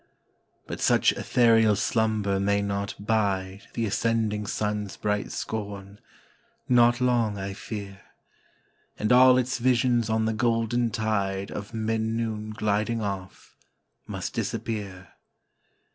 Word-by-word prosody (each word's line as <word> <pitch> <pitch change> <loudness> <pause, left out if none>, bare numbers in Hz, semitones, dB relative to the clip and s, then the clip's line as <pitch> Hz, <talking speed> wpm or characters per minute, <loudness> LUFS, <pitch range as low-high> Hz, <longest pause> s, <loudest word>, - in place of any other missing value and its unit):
But - - -6
such - - +4
ethereal 115 -3 +3
slumber 105 -2 0
may 100 +1 +1
not 100 0 -3
bide 100 -2 -1
The 115 - 0
ascending 110 -1 0
sun's 105 -1 -2
bright 105 -1 -1
scorn 100 -2 -5 0.7
not 120 -1 +4
long, 120 -5 +1
I 95 0 -4
fear; 100 -2 -7 1.0
And 105 - 0
all 130 +1 +7
its 130 0 0
visions 120 -2 +2
on 110 0 +1
the 110 - 0
golden 115 +1 +1
tide 100 -4 -1
Of 105 +3 -7
mid 110 0 -1
noon 110 -1 -2
gliding 110 +1 -1
off, 95 -2 -6 0.5
must - - -5
disappear. 100 -5 -4
110 Hz, 115 wpm, -26 LUFS, 100-115 Hz, 1.0 s, all